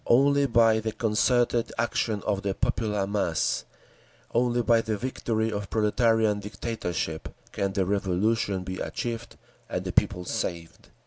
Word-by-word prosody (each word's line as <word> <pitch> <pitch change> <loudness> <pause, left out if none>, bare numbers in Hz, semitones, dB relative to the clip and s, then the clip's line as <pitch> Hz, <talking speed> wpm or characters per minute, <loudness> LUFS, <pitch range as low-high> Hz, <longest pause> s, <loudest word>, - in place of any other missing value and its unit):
Only 140 +3 +4
by 115 -2 +4
the 110 0 -3
concerted 115 +2 +2
action 115 -2 0
of 100 -2 0
the 100 -1 -2
popular 110 -4 0
mass, 100 -5 0 0.7
only 120 0 +2
by 115 0 +4
the 110 -2 -2
victory 115 -2 -1
of 100 -2 -4
proletarian 110 -1 +2
dictatorship, 100 -6 -4 0.2
can 100 -1 -1
the 95 -2 +1
Revolution 100 +1 0
be 95 0 -5
achieved 120 0 -4 0.3
and - - -3
the - - -2
people 90 0 +1
saved…. 85 -2 -4
110 Hz, 135 wpm, -27 LUFS, 100-115 Hz, 0.7 s, Only